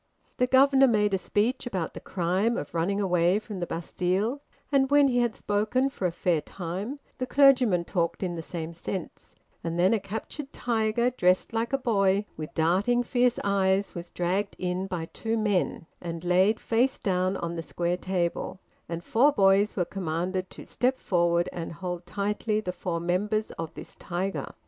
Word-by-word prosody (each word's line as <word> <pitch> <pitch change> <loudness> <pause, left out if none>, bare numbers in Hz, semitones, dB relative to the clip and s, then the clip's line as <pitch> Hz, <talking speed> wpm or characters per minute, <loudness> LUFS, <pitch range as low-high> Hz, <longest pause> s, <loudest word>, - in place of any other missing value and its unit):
The 250 - +2
governor 270 +1 +6
made 210 -4 +2
a 190 - +2
speech 235 +7 0
about 185 -8 -3
the - - -7
crime 190 +6 0
of 145 - -5
running 175 +4 0
away 180 -1 +3
from 210 -2 -6
the 175 - -3
Bastille, 185 - -1 0.3
and 270 -1 +3
when 285 -1 +5
he 245 -1 +2
had 240 -2 +1
spoken 220 +6 0
for 190 -8 -1
a - - -3
fair 170 -2 0
time, 190 - -5 0.2
the 255 - -2
clergyman 255 -10 +5
talked 170 +1 -1
in 175 -2 -2
the 165 - -4
same 165 0 -5
sense; 170 +1 -6 0.3
and 165 0 -3
then 185 +4 +4
a 225 - +2
captured 220 +8 -6
tiger, 235 +1 0
dressed 185 -3 +2
like 230 +1 -1
a 275 - +2
boy, 200 -5 +2
with 155 -1 -7
darting 195 +10 +2
fierce 245 -1 +2
eyes, 195 0 +1
was 175 0 -7
dragged 190 +3 -1
in 180 +1 -2
by 180 -4 -3
two 225 +6 -3
men, 205 -6 0 0.2
and 170 -1 -5
laid 185 +5 +3
face 245 +4 +1
down 185 0 0
on 170 0 -4
the 165 - -3
square 175 +2 -2
table, 180 0 -2 0.3
and 170 0 -4
four 265 +11 +4
boys 200 -3 +3
were 180 - +1
commanded 185 +1 -3
to - - -11
step 255 +1 0
forward 175 -3 +1
and 170 -1 -5
hold 180 +1 -5
tightly 210 +2 -1
the 180 -4 -4
four 175 -2 -3
members 205 +5 0
of 165 -1 -6
this - - -10
tiger. 185 +2 -3
195 Hz, 180 wpm, -27 LUFS, 175-225 Hz, 0.3 s, governor